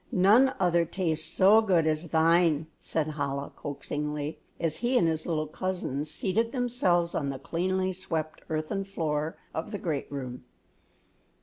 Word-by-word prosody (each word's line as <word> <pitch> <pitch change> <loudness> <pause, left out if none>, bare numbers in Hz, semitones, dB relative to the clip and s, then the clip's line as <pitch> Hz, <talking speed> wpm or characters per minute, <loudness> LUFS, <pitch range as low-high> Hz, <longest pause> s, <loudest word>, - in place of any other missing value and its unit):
None 215 +8 +5
other 175 -2 +3
tastes 165 -2 -1
so 205 +4 +6
good 180 -7 +3
as 155 +2 0
thine," 165 -1 +3
said 155 -1 -1
Chola, 140 -1 -2
coaxingly, 150 +1 -4 0.2
as 160 -2 0
he 245 +1 +1
and 170 - +4
his 160 -1 -1
little 155 -3 0
cousins 155 -3 -3
seated 220 +8 0
themselves 230 -10 +1
on 140 -3 -1
the 135 - -3
cleanly 185 +6 -1
swept 160 -4 -4
earthen 160 +5 -2
floor 160 -5 -2 0.2
of 160 - -3
the 210 - -4
great 155 -8 -3
room. 125 -3 -5
165 Hz, 145 wpm, -28 LUFS, 155-185 Hz, 0.2 s, so